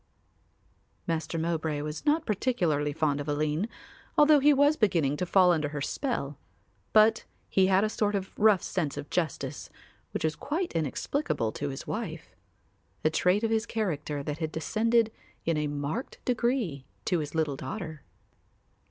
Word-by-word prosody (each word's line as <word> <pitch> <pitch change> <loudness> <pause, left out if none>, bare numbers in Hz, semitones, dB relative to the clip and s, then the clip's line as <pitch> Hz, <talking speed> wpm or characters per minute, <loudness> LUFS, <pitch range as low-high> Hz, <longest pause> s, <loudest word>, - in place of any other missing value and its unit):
Master 165 -1 -2
Mowbray 160 -2 -1
was 150 - -5
not 310 +2 +3
particularly 175 - +1
fond 145 -1 0
of 145 - -7
Aline, 150 +7 0 0.5
although 300 0 +7
he 290 +2 +6
was 285 +2 +4
beginning 170 - +2
to 180 - -2
fall 185 0 +5
under 155 -4 +1
her 145 0 -4
spell, 145 - -2 0.5
but 220 +1 +5 0.2
he 190 -1 +4
had 190 +1 +4
a - - +3
sort 210 -1 0
of 190 -1 -3
rough 210 -4 +4
sense 155 -6 -2
of 145 0 -7
justice, 165 -6 -2 0.4
which - - -4
was 155 -1 +1
quite 330 - -2
inexplicable 160 - -1
to 145 +4 -3
his 135 0 -6
wife; 170 -8 -5 0.7
a 155 - +4
trait 180 +6 +2
of 225 - +1
his 225 +1 +1
character 150 -9 -2
that 150 +2 -4
had 160 -2 -2
descended 225 +7 +2 0.3
in 165 - +2
a 150 0 0
marked 145 - -3
degree 235 - 0 0.2
to 180 - +1
his 150 0 -5
little 155 -3 +1
daughter. 160 -1 -6
170 Hz, 160 wpm, -28 LUFS, 150-220 Hz, 0.7 s, although